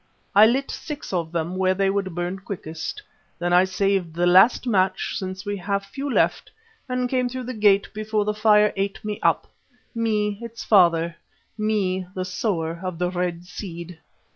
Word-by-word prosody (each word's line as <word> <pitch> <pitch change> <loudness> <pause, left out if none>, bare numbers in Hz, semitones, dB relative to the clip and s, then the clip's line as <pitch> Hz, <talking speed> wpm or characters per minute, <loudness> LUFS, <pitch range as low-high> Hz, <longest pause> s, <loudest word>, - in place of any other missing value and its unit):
I 210 +2 +8
lit 265 +4 0
six 300 -8 -7
of 170 -3 -1
them 170 +1 -2
where 185 0 +2
they 195 0 +2
would 195 -3 -2
burn 175 +2 -3
quickest. 190 - -6 0.3
Then 175 0 -1
I 180 +1 +6
saved 190 -3 0
the 175 +1 +1
last 190 +9 +5
match, 190 -6 +1
since 190 +1 -5
we 205 0 -2
have 200 +2 -2
few 275 +7 -5
left, - - +1 0.4
and 250 0 0
came 250 -1 0
through 255 +1 -5
the 255 +1 -5
gate 205 -3 +3
before 215 0 -1
the 210 - 0
fire 210 0 +4
ate 195 +2 -3
me 210 -1 -3
up; - - +2 0.5
me, 210 -3 0
its 230 0 -7
father, 170 -4 +4 0.4
me 200 -4 0
the 185 -1 -2
Sower 170 -4 -2
of 185 -2 -4
the 180 +1 -1
Red 175 -1 -2
Seed!" 175 -2 -8
195 Hz, 175 wpm, -23 LUFS, 180-215 Hz, 0.5 s, I